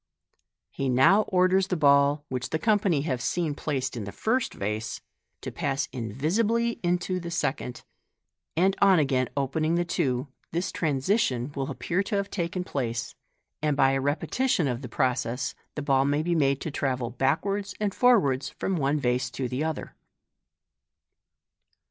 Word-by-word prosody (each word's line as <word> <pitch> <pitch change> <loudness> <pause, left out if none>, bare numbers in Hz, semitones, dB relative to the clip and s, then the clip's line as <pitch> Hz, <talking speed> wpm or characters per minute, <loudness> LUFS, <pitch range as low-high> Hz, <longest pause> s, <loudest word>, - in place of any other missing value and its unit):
He 135 -1 -2
now 135 +12 +5
orders 185 0 +3
the 180 - -1
ball, 140 0 +4
which 130 -1 -3
the 160 - 0
company 200 -6 +2
have 130 -5 -2
seen 165 0 -1
placed 135 -4 -2
in 110 -4 -4
the 100 - -6
first 240 - 0
vase, 105 +3 -3 0.4
to - - -5
pass 135 +1 -1
invisibly 195 - 0
intc 180 +1 -1
the 170 - -5
second; 145 -6 -2 0.7
and 190 +3 +3
on 195 -2 +6
again 135 -4 +1
opening 155 +4 0
the 175 0 +1
two, 130 -5 -1 0.2
this 170 +3 -1
transposition 140 - 0
will 135 0 -2
appear 170 +6 -1
to 205 +2 -3
have 200 0 -1
taken 180 0 -2
place, 120 -8 -3 0.5
and 150 -2 +1
by 135 -1 +5
a 135 0 0
repetition 165 - 0
of 125 -1 -2
the 125 - -7
process 125 -1 -1 0.2
the 150 - -3
ball 135 -2 +3
may 145 +2 +1
be 175 +1 0
made 140 -4 +2
to 160 - -4
travel 130 -4 -1
backwards 195 - -1
and 205 -2 0
forwards 190 - +3
from 190 -2 -2
one 145 0 +1
vase 125 -1 0
to 125 +1 -3
the 130 +4 -2
other. 160 0 -4
145 Hz, 160 wpm, -27 LUFS, 130-180 Hz, 0.7 s, on